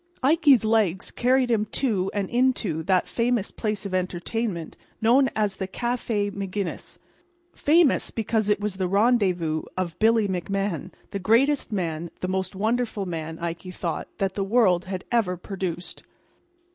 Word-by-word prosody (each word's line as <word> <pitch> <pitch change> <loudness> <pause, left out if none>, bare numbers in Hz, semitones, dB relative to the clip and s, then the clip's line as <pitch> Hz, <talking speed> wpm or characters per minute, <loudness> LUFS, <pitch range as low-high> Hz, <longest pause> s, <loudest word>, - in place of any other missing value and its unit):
Ikey's 285 - +5
legs 210 -5 +1
carried 250 0 +2
him 215 -2 +2
to 210 -5 0
and 200 -2 -2
into 240 -10 +1
that 185 +2 +2
famous 235 -3 0
place 210 -2 -3
of 195 - -5
entertainment 185 0 -2 0.2
known 260 +4 +4
as 210 -3 0
the 190 - -3
Café 225 -1 -1
Maginnis—famous 310 - -1
because 220 -1 -1
it 210 - +3
was 205 -2 -3
the 185 -1 0
rendezvous 185 -7 +2 0.2
of 175 -3 -3
Billy 225 -1 +4
McMahan, 190 -1 -2 0.2
the 200 - -3
greatest 245 +9 +2
man, 170 -4 -2
the 185 - -2
most 190 0 -2
wonderful 220 0 -1
man, 165 -2 -5
Ikey 170 +2 -5
thought, 170 -2 -4
that 195 -1 -1
the 200 - -1
world 195 -4 +3
had 190 -1 -5
ever 210 -7 +1
produced. 180 -2 -5
200 Hz, 145 wpm, -25 LUFS, 185-235 Hz, 0.2 s, Ikey's